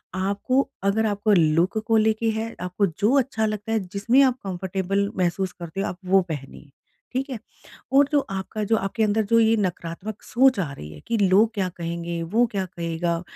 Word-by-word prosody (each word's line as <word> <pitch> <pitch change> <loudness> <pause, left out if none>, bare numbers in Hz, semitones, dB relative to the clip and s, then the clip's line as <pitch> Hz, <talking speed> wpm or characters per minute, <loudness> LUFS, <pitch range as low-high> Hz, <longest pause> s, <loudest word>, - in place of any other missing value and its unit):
आपको 200 +8 0 0.2
अगर 205 +3 +2
आपको 205 +1 +1
लूक 170 +2 +3
को 225 -1 +4
लेके 220 +1 +2
है, 220 +1 -4
आपको 180 +3 0
जो 205 +8 0
अच्छा 240 -4 -1
लगता 215 0 -3
है 225 - +2
जिसमें 205 +7 +2
आप 255 -2 +2
कम्फ़र्टेबल 190 +1 -2
महसूस 185 +1 0
करते 175 +2 -6
हो 200 - -1
आप 180 - -5
वो 190 +1 +4
पहनिए। 145 -1 -7 0.4
ठीक 265 +3 -2
है 255 - -4 0.6
और 275 +1 +5
जो 290 - +4
आपका 195 +3 -4
जो 225 - +5
आपके 200 +2 -2
अंदर 215 +1 +2
जो 230 - +5
ये 225 0 +4
नकारात्मक 185 +1 -4
सोच 260 -1 +3
आ 155 -6 -3
रही 75 - -9
है 75 - -11
कि 230 - +1
लोग 205 +3 +4
क्या 195 -4 0
कहेंगे? 170 0 -4
वो 220 +9 +2
क्या 195 -2 -1
कहेगा? 170 -1 -2
200 Hz, 195 wpm, -24 LUFS, 175-220 Hz, 0.6 s, और